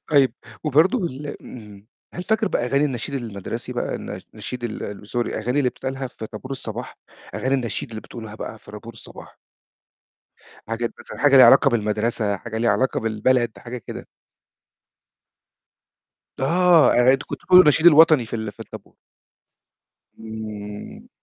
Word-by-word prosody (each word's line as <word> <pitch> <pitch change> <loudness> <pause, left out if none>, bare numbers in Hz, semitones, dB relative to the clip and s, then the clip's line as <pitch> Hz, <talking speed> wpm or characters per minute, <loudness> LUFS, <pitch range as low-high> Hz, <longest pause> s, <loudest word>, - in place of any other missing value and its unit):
طيب 135 -5 +4 0.3
وبرضه 155 - +3
ال 145 0 -7
آمم، 105 -4 -12 0.3
هل 180 - -5
فاكر 220 +2 0
بقى 120 - -1
أغاني 140 +4 +2
النشيد 135 0 -3
المدرسي 110 -7 -5
بقى، - - -3
الن - - -6
النشيد 125 -1 -6
ال 105 -2 -6
Sorry، - - -8
الأغاني 120 +2 -1
اللي 130 -3 +2
بتتقالها 130 +1 -5
في 115 -3 -9
طَابور 110 +5 -10
الصباح، 135 - -6 0.4
أغاني 130 +1 0
النشيد 120 -6 -2
اللي 110 -1 -7
بتقولوها 110 -3 -10
بقى 110 0 -7
في - - -15
طابور 105 +2 -10
الصباح؟ 115 - -13 1.3
حاجات 115 +1 -2
مثلًا - - -10
حاجة 145 -2 +5
ليها 130 -2 +10
علاقة 135 +3 +6
بالمدرسة، 105 -1 0
حاجة 110 +2 -6
ليها 115 +1 +2
علاقة 130 0 +1
بالبلد، 115 +2 0
حاجة 125 +1 -7
كده؟ 115 - -9 2.3
آه، 170 +4 +4
آآ 125 +2 +5
أنتم 135 +1 -1
كنتم - - -6
بتقولوا 185 0 +8
النشيد 155 +2 +4
الوطني 155 -5 +7
في 115 - -4
ال 110 -2 -5
في - - -20
الطابو - - -11 1.2
امم. 110 - -8
120 Hz, 150 wpm, -22 LUFS, 110-140 Hz, 2.3 s, ليها